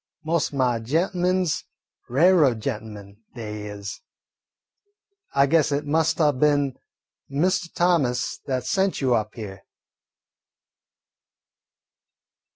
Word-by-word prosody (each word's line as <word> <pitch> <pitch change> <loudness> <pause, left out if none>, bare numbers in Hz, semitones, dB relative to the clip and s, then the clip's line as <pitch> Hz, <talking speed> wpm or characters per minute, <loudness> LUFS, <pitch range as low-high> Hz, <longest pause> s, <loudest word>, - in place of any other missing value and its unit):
Most 165 0 0
o' 140 - -6
my 125 -3 +2
gent'men 180 +8 +1
's 160 -1 -1 0.5
railroad 145 -3 +4
gent'men, 105 -4 -6 0.2
they 105 -3 -6
is. 105 0 -7 1.3
I 140 0 +5
guess 155 +1 +2
it 145 +1 -1
must 160 +2 +1
'a' 150 -2 +4
been 145 0 +2 0.6
Mr. 175 +5 0
Thomas 150 -9 +1
that 130 -2 -1
sent 190 +6 +1
you 130 -3 +2
up 110 -2 -1
here." 100 -5 -8
140 Hz, 105 wpm, -24 LUFS, 115-165 Hz, 1.3 s, I